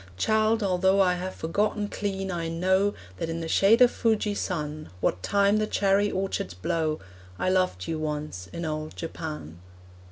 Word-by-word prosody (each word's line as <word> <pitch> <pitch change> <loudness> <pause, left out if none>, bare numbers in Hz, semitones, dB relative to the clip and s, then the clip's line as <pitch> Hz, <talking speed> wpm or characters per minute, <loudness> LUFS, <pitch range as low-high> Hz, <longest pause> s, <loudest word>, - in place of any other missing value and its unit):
Child, 220 - +2
although 190 0 +3
I 185 -2 +4
have 180 +1 -4
forgotten 205 +5 0
clean, 195 -2 -3
I 165 -2 -2
know 190 +4 +2 0.2
That 160 - -3
in 165 0 -3
the 165 - -4
shade 220 +8 +5
of 245 - +5
Fujisan, 185 -9 -1
What 90 - 0
time 200 - +3
the 215 0 +1
cherry 200 0 +2
orchards 190 - -2
blow, 155 - -1 0.4
I 185 - 0
loved 185 - +1
you 160 - -2
once 150 -12 -4
in 170 - -4
old 155 0 -4
Japan. 155 - -6
185 Hz, 160 wpm, -27 LUFS, 155-200 Hz, 0.4 s, shade